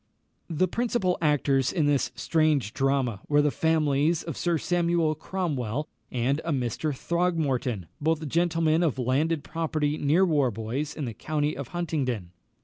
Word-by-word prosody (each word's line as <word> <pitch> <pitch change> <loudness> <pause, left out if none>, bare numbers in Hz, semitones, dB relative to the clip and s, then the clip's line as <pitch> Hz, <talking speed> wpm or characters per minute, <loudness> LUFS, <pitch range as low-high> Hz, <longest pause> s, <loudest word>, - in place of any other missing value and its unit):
The 175 +3 +1
principal 225 -3 0
actors 140 -4 +2
in 165 -5 +1
this 145 -2 +1
strange 155 -8 +1
drama 135 -6 0
were 145 0 +4
the 150 - +2
families 155 0 +1
of 165 -3 -5
Sir 175 -1 0
Samuel 170 -1 +1
Cromwell 150 - -3 0.2
and 130 +5 0
a 165 - -2
Mr. 130 +3 -1
Throgmorton, 140 - -1 0.2
both 160 0 0
gentlemen 165 0 +2
of 160 -7 +1
landed 140 +5 0
property 155 -1 -1
near 155 +7 +3
Warbois 135 - -1
in 150 - -2
the 115 - -4
county 150 +6 -1
of 135 -1 -5
Huntingdon. 135 - -2
150 Hz, 140 wpm, -27 LUFS, 135-165 Hz, 0.2 s, were